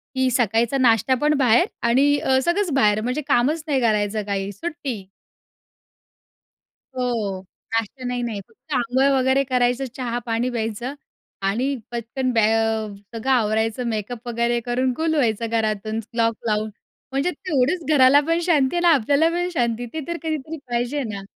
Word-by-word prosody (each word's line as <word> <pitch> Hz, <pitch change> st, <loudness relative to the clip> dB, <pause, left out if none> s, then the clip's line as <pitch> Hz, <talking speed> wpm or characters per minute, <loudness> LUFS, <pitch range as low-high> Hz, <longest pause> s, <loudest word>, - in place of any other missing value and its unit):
की 260 Hz, 0 st, +2 dB
सकाळचा 235 Hz, +2 st, +1 dB
नाश्तापण 260 Hz, +4 st, +3 dB
बाहेर 250 Hz, +5 st, +4 dB, 0.2 s
आणि 280 Hz, +4 st, +4 dB
अ, 260 Hz, 0 st, +2 dB
सगळंच 350 Hz, 0 st, +1 dB
बाहेर 215 Hz, -5 st, +3 dB
म्हणजे 250 Hz, +6 st, -2 dB
कामच 290 Hz, +5 st, +2 dB
नाही 270 Hz, -3 st, +1 dB
करायचं. 215 Hz, -1 st, +1 dB
काही 200 Hz, -1 st, -2 dB
सुट्टी. 245 Hz, -, -5 dB, 1.9 s
हो, 225 Hz, -7 st, -2 dB, 0.3 s
नाश्ता 225 Hz, +3 st, -2 dB
नाही, 245 Hz, 0 st, -2 dB
नाही, 225 Hz, -4 st, -3 dB
फक्त 310 Hz, -, -11 dB
आंघोळ 255 Hz, +2 st, +2 dB
वगैरे 265 Hz, +1 st, +3 dB
करायचं, 250 Hz, 0 st, +1 dB
चहा-पाणी 240 Hz, -1 st, -2 dB
प्यायचं 235 Hz, +2 st, -3 dB, 0.5 s
आणि 250 Hz, +8 st, 0 dB, 0.2 s
पटकन 240 Hz, +2 st, -2 dB
बॅ 225 Hz, -2 st, +3 dB
अ, 225 Hz, -1 st, +1 dB, 0.3 s
सगळं 230 Hz, +4 st, -2 dB
आवरायचं, 220 Hz, 0 st, +1 dB
मेकअप 225 Hz, +3 st, -5 dB
वगैरे 235 Hz, 0 st, 0 dB
करून 255 Hz, +2 st, 0 dB
गुल 320 Hz, 0 st, 0 dB
व्हायचं 230 Hz, -4 st, +1 dB
घरातून 220 Hz, -1 st, -1 dB, 0.2 s
लॉक 230 Hz, 0 st, +2 dB
लावून. 215 Hz, 0 st, 0 dB, 0.4 s
म्हणजे 275 Hz, +7 st, 0 dB
तेवढंच 315 Hz, 0 st, 0 dB
घराला 265 Hz, 0 st, +6 dB
पण 330 Hz, +1 st, +2 dB
शांती, 300 Hz, -4 st, +2 dB
आहे 345 Hz, -, +1 dB
ना. 345 Hz, -, +5 dB
आपल्याला 285 Hz, +5 st, +3 dB
पण 350 Hz, +1 st, -1 dB
शांती. 240 Hz, -4 st, 0 dB
ते 320 Hz, -, -3 dB
तर 340 Hz, 0 st, -3 dB
कधीतरी 315 Hz, 0 st, -3 dB
पाहिजे 245 Hz, +4 st, -1 dB
ना. 200 Hz, -, -5 dB
245 Hz, 150 wpm, -22 LUFS, 225-275 Hz, 1.9 s, घराला